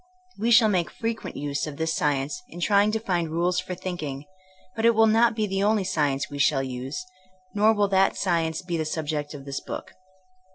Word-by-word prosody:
We 225 +3 +1
shall 235 -1 +7
make 180 -5 +1
frequent 225 0 -4
use 145 +1 -2
of 145 -2 -7
this 160 0 -1
science 150 - -1
in 175 - -10
trying 205 +3 +3
to 220 - +1
find 175 -6 -1
rules 175 +3 +1
for 180 - -5
thinking, 155 -7 -5 0.5
but 225 - -3
it 230 0 +5
will 225 0 +6
not 225 +1 +4
be 215 -1 0
the 195 -1 -2
only 210 0 +2
science 150 -7 0
we 145 -1 -7
shall 140 -1 +3
use, 130 - -5 0.5
nor 210 +2 +4
will 205 -1 +2
that 195 0 +3
science 165 -3 0
be 175 -2 -2
the 160 - 0
subject 150 -1 -3
of 135 -1 -10
this 140 0 -4
book. - - -7
175 Hz, 205 wpm, -25 LUFS, 150-210 Hz, 0.5 s, shall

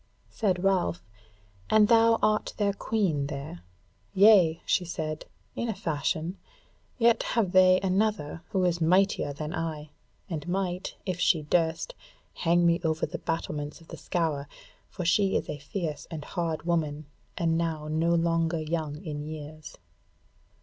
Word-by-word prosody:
Said 185 -4 0
Ralph, 185 -3 +1 0.7
"And 215 -1 +5
thou 230 0 +5
art 215 0 +1
their 200 -2 +1
Queen 190 -10 0
there?" 140 - -6 0.6
"Yea," 190 -5 +6
she 185 - +2
said, 155 -3 -4 0.3
"in 235 - -2
a 220 - -2
fashion; 160 +3 -2 0.6
yet 235 -1 +4
have 220 -6 0
they 185 0 +6
another 190 -5 0
who 190 -2 +1
is 175 -1 0
mightier 185 -1 +3
than 150 +3 -5
I, 155 -3 -4 0.4
and 165 -4 -5
might, 180 0 -2
if 185 -3 -3
she 170 -4 +3
durst, 165 - 0 0.4
hang 175 0 +2
me 170 0 +3
over 160 -1 0
the - - -6
battlements 150 -2 -4
of 165 - -19
the - - -7
Scaur, 160 -6 -2 0.4
for 180 - -5
she 195 +3 +3
is - - -4
a 150 - -5
fierce 155 +1 -4
and 155 -3 -6
hard 165 -3 -3
woman, 155 -3 -1 0.3
and 165 -1 +1
now 160 -2 -2
no 165 +2 +1
longer 165 0 +1
young 155 +1 -3
in 150 -2 -4
years." 155 0 -8
170 Hz, 150 wpm, -28 LUFS, 155-190 Hz, 0.7 s, Yea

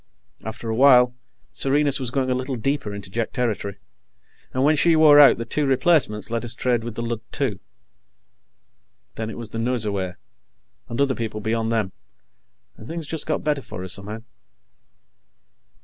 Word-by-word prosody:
After 110 +1 -7
a 110 - -1
while, 125 -1 +6 0.4
Serenus 140 0 +2
was 130 -3 -2
going 130 0 -1
a - - +3
little 130 +1 -3
deeper 135 -1 -2
into 100 -2 -8
Jek 115 +2 -2
territory, 105 -5 -2 0.7
and 130 - 0
when 155 +2 +4
she 165 +2 +4
wore 155 -2 +7
out, 145 - +8
the 115 - -4
two 145 +5 0
replacements 135 -7 +2
let 115 0 -1
us 120 0 -4
trade 120 -2 0
with 115 -1 -6
the 115 - -3
Lud, 115 -1 -3
too. - - -2 1.5
Then 110 0 -4
it - - -7
was 115 -2 -7
the 115 - -4
Nosurwey, 105 -6 -1 0.7
and 115 - -4
other 140 -1 +3
people 110 -3 -4
beyond 110 +1 -1
them, 110 -4 0 0.9
and 110 - -12
things 165 -1 -5
just 160 0 -5
got 155 - -1
better 150 -2 0
for 90 - -8
us, 95 - -3
somehow. 105 +2 -7
120 Hz, 170 wpm, -23 LUFS, 110-140 Hz, 1.5 s, out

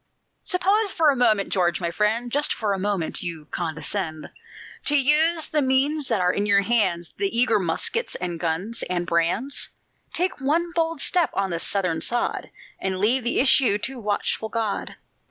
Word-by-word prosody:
Suppose 395 +3 +1
for 315 -4 +3
a - - -1
moment, 220 -5 +2
George, 175 -3 +1
my 170 -2 -2
friend 220 +6 0
Just 290 +3 +1
for 210 -3 -1
a 195 - -3
moment 195 -4 -1
you 165 -4 -5
condescend 160 0 -3 0.5
To 295 -1 +4
use 310 +4 +3
the 300 - 0
means 275 +2 +1
that 225 -4 0
are 180 0 +2
in 205 +1 -1
your 200 -1 +4
hands, 190 -6 0
The 395 -1 0
eager 245 -3 +3
muskets 190 - -1
and 175 -2 -4
guns 180 +8 -2
and 175 -1 -1
brands; 175 +12 0 0.4
Take 360 -4 -2
one 330 +5 0
bold 330 -3 -1
step 355 -3 +2
on 195 -2 -1
the 170 - -2
Southern 180 -4 0
sod, 240 +7 0 0.3
And 190 -1 -2
leave 225 +7 +2
the 240 - 0
issue 260 -5 +4
to 260 +4 -4
watchful 210 +1 -1
God! 220 -2 -3
215 Hz, 175 wpm, -23 LUFS, 180-285 Hz, 0.5 s, To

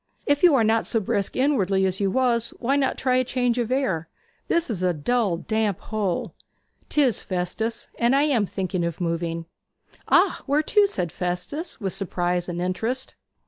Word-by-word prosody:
If 285 0 +2
you 345 -5 +6
are 240 - +4
not 220 +1 +2
so 225 - +1
brisk 200 -1 -2
inwardly 200 -9 +2
as 190 0 -1
you 200 -1 +1
was, 235 0 +1
why 260 +3 0
not 275 -2 +1
try 255 -1 +2
change 245 -1 0
of 240 0 -1
air? 220 - 0 0.4
This 340 0 +1
is 190 -5 -3
a 180 -1 +2
dull, 200 +3 +1
damp 215 0 -1
hole.' 205 -5 -2 0.6
''Tis, 270 -7 +2
Festus; 190 +5 -3
and 235 +3 +3
I 280 - +4
am 250 -9 +2
thinking 185 -2 -2
of 170 -1 -3
moving.' 165 -1 -2 0.6
'Ah, 365 +1 +3
where 290 +3 +2
to?' 415 +4 +4
said 180 - -3
Festus, 180 - -4
with 195 -4 -2
surprise 180 -2 -1
and 175 0 -4
interest. 220 +9 -2
220 Hz, 175 wpm, -24 LUFS, 180-260 Hz, 0.6 s, you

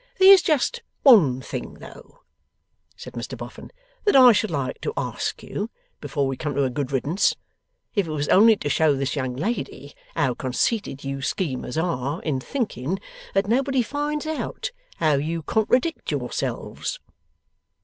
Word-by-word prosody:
'There's 385 0 +9
just 300 -7 +1 0.2
one 160 - +6
thing - - -6
though,' - - -14 0.8
said - - -10
Mr - - -6
Boffin, - - -9 0.3
'that 410 - +3
I 255 -2 +9
should 220 0 +1
like 130 -2 -3
to 445 - -3
ask - - -3
you - - -4 0.3
before 140 -3 -1
we 135 0 -1
come 145 0 -4
to 140 - +2
a 130 - 0
good 140 0 -3
riddance, 145 +8 +1 0.6
if 200 -5 +1
it - - -4
was 145 -1 -2
only 220 +3 +7
to 150 - -5
show 150 0 +3
this 135 +1 -2
young 130 -3 -2
lady 145 - -4 0.2
how 135 -6 +1
conceited 135 - -1
you 135 0 -4
schemers 130 0 -2
are, 160 -3 -1
in 145 -5 -1
thinking 190 - -3 0.4
that 195 0 +2
nobody 265 +2 +2
finds 295 +4 -2
out 315 +9 -3 0.2
how 155 -2 +2
you 160 +3 -2
contradict 250 - +1
yourselves. - - -3
165 Hz, 155 wpm, -24 LUFS, -, 0.8 s, There's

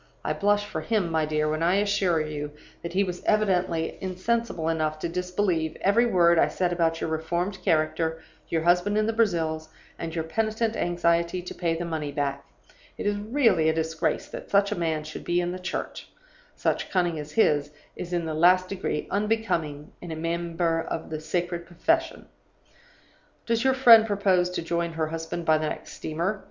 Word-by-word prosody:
I - - +1
blush 205 0 +2
for 160 -6 -4
him, 195 -1 0
my 160 -1 +1
dear, 155 0 0
when 155 +1 -1
I 175 +3 +3
assure 200 -4 +2
you 150 -1 -4 0.3
that 170 - -6
he 195 +2 +3
was 180 -2 -5
evidently 180 -6 +1
insensible 190 -1 -1
enough 155 -1 0
to 155 - -3
disbelieve 180 -2 -1
every 230 +5 +4
word 170 -5 +4
I - - +5
said 180 -1 -1
about 165 -1 +1
your - - -2
reformed 175 +5 -2
character, 160 +1 +1 0.3
your 160 -1 0
husband 180 +4 +3
in 215 - +2
the 225 - 0
Brazils, 165 -8 0 0.3
and 165 0 -5
your 165 - -1
penitent 220 +6 -1
anxiety 170 0 +1
to 180 - -7
pay 170 -2 -1
the 170 +1 -3
money 155 -3 -3
back. 140 -1 -2 0.5
It - - -5
is 205 0 +1
really 215 - +2
a - - +2
disgrace 160 0 -1
that - - -8
such 200 0 +3
a - - 0
man 160 -2 -1
should 155 0 -8
be 175 0 +1
in 175 0 -1
the 185 - -5
Church; 180 - -5 0.5
such - - -1
cunning 175 -4 0
as 150 0 -8
his 145 -9 +3 0.3
is 175 - -7
in 175 -2 -1
the 160 - -3
last 180 +3 +4
degree 190 -6 -2
unbecoming 195 -9 -1
in 175 - -7
a - - -3
member 165 0 -1
of 160 - -5
a 155 - -2
sacred 170 +2 -3
profession. 330 - 0 1.2
"'Does 230 0 +1
your 265 0 +3
friend 230 -4 +8
propose 190 -3 +2
to 180 - -4
join 170 0 -1
her 160 -1 -1
husband 165 +1 -4
by 155 -1 +4
the 155 -1 -1
next - - -7
steamer? 170 +6 -2
170 Hz, 190 wpm, -26 LUFS, 160-195 Hz, 1.2 s, friend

